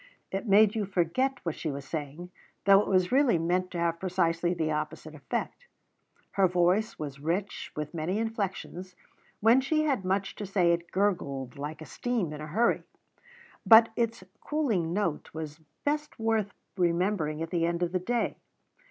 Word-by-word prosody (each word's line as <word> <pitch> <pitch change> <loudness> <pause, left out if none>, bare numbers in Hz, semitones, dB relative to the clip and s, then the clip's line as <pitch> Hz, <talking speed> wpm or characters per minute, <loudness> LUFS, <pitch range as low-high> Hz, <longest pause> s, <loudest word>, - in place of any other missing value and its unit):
It 195 +4 -3
made 205 +1 +6
you 215 -4 -2
forget 200 +9 0
what 165 - 0
she 160 - -4
was 140 -1 -5
saying, 155 +4 -6 0.3
though 195 -1 +8
it - - -4
was 185 -2 +2
really 265 -7 +4
meant 180 +3 0
to 175 - -6
have 170 0 0
precisely 175 -2 +1
the 160 -3 -1
opposite 150 +1 -4
effect. 155 - -4 0.6
Her 195 -1 +3
voice 180 +5 +2
was 140 -3 -6
rich, 175 +7 -2
with 150 +1 -4
many 170 +4 -1
inflections. 195 -5 -4 0.5
When 230 +5 +6
she 310 +3 +1
had 275 -10 0
much 190 +1 -1
to 205 - -5
say 180 -3 +3
it 170 0 -3
gurgled 140 -10 -1
like 150 +2 -5
a - - -10
stream 225 -10 -2
in 150 - -7
a 155 - -6
hurry; 220 +10 +2 0.8
but 225 0 +8
its 230 -4 -1 0.2
cooing 225 - 0
note 175 -5 -1
was 155 -1 -6 0.3
best 300 +1 -1
worth 225 -2 0 0.3
remembering 170 -3 +1
at 165 - -6
the 170 -2 +1
end 170 +1 -1
of 175 - -1
the 185 - 0
day. 235 +6 -1
180 Hz, 170 wpm, -29 LUFS, 165-215 Hz, 0.8 s, though